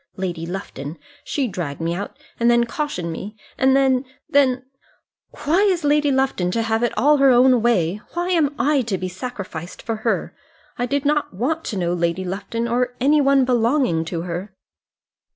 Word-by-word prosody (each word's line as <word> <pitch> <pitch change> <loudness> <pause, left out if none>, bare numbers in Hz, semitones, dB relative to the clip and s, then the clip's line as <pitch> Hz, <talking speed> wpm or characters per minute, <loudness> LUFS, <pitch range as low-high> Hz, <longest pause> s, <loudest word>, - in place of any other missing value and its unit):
Lady 175 -3 -4
Lufton 165 -4 -6 0.3
she 275 -3 -1
dragged 175 -9 -5
me 165 +1 -1
out, 200 +4 -5 0.2
and 235 0 +3
then 235 0 +4
cautioned 235 - -3
me, 200 +6 -7 0.2
and 265 0 +3
then, 265 -1 +3 0.2
then 265 -4 +2 0.8
Why 320 +6 +3
is 375 -5 +2
Lady 295 0 +3
Lufton 265 -9 +1
to 230 - 0
have 225 0 0
it 240 - +1
all 295 +2 +4
her 275 -1 +5
own 250 -1 +5
way? 210 -5 +1
Why 350 +1 -2
am 310 -5 +2
I 290 -1 +2
to 195 -4 0
be 185 - -3
sacrificed 185 -4 -7
for 225 -1 -2
her? 225 +1 -2 0.4
I 245 - -2
did 285 +2 -1
not 295 -8 0
want 310 - -1
to 210 - -3
know 175 -1 0
Lady 170 +1 -1
Lufton, 205 +5 -3
or 245 +1 0
any 290 +4 +4
one 275 -1 +4
belonging 240 - +2
to 165 0 -3
her." 180 +3 -5
235 Hz, 180 wpm, -21 LUFS, 185-275 Hz, 0.8 s, her